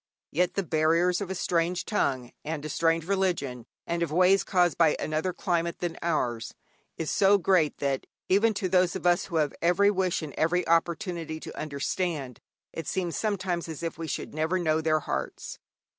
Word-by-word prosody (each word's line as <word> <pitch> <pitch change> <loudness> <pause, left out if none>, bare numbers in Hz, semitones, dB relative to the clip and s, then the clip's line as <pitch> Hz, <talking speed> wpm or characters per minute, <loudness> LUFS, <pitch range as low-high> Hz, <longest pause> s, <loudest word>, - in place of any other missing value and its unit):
Yet 180 +3 +1
the 195 - 0
barriers 165 +3 +2
of 195 - -4
a 190 - -3
strange 175 +1 0
tongue 130 - -1
and 155 -1 -4
a - - -4
strange 165 +1 +1
religion, 170 -11 -1 0.2
and 170 0 -2
of 170 -3 -1
ways 185 +4 +4
caused 175 -3 +2
by 165 -3 +4
another 155 +4 -1
climate 170 -1 -1
than 175 -2 -3
ours, 125 -9 -1 0.4
is 165 - -2
so 200 +1 +5
great 175 -4 +2
that, 140 -2 -2 0.2
even 210 +3 +3
to 200 -2 -1
those 180 -1 +3
of 190 - -5
us 175 0 +3
who 175 - -7
have 150 -3 +1
every 180 +4 +4
wish 185 -4 0
and 145 -3 -6
every 175 +3 +1
opportunity 165 -1 0
to - - -8
understand, 145 -2 -3 0.3
it 165 - -6
seems 175 -3 -2
sometimes 185 -5 -1
as 160 +1 -6
if 165 -1 -4
we 165 - -4
should - - -4
never 160 +4 0
know 160 -3 +1
their 155 -1 +2
hearts. 65 - -4
170 Hz, 185 wpm, -27 LUFS, 155-180 Hz, 0.4 s, so